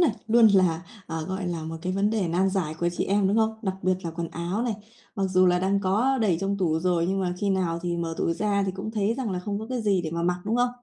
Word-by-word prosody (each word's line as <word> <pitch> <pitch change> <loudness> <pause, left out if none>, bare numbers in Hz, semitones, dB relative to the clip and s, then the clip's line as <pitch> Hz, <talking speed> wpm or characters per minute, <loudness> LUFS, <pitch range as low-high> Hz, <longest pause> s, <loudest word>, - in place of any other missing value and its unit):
nè, 345 - +5 0.2
luôn 230 0 +6
là, 185 -5 +3 0.2
à, 160 0 -4
gọi 190 -1 -3
là, 165 -2 -3
một 165 0 -5
cái 185 +1 -1
vấn 200 +2 +1
đề 205 -6 0
nan 185 +3 +2
giải 175 -5 -1
của 175 +2 0
chị - - 0
em, 195 -1 +2
đúng 205 - +1
không? 220 0 +2
Đặc 190 -2 -1
biệt 185 +1 +3
là 165 - -2
quần 165 0 -4
áo 175 +7 -3
này, 235 -4 -1 0.4
mặc 195 - 0
dù 185 0 +4
là 180 0 +4
đang 195 +2 +1
có 225 +8 +2
đầy 200 -7 +2
trong 200 +1 -1
tủ 160 -4 +1
rồi 175 -1 +1
nhưng 195 0 0
mà 180 -1 0
khi 200 +1 0
nào 180 -3 0
thì 175 -1 -1
mở 165 -1 -3
tủ 165 - +1
ra 200 +2 0
thì 190 - -1
cũng 195 +3 -5
thấy 215 0 0
rằng 250 -4 -3
là 185 - -2
không 200 +2 -3
có 220 - -6
cái 250 -1 -3
gì 195 -4 +2
để 160 - -4
mà 170 0 -2
mặc, 180 +1 0
đúng 220 +3 0
không? 245 0 +3
190 Hz, 300 wpm, -26 LUFS, 175-210 Hz, 0.4 s, luôn